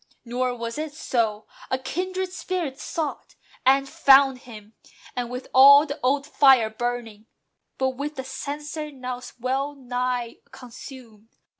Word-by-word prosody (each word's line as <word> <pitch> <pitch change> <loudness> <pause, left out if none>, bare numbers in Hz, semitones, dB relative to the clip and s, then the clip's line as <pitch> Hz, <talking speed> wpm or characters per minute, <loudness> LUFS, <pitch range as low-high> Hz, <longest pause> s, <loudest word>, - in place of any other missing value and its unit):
Nor 250 +1 -1
was 230 +3 -5
it 305 -1 -5
so. 220 -8 -1 0.2
A 260 - +1
kindred 370 +6 -3
spirit 345 -8 -4
sought, 315 -3 -5 0.3
And 275 +1 +4
found 270 -1 +5
him! 220 -4 -13 0.4
and 245 -1 -3
with 250 +1 -6
all 280 +3 +9
the 285 -1 -6
old 275 +2 +1
fire 265 -7 +5
burning; 230 -2 -4 0.5
But 265 0 +1
with 295 +2 -4
the 265 - -5
censer 295 +3 -6
now 255 -2 -6 0.2
well 270 +4 -2
nigh 250 -2 -3
consumed. 235 -3 -13
260 Hz, 135 wpm, -24 LUFS, 245-285 Hz, 0.5 s, all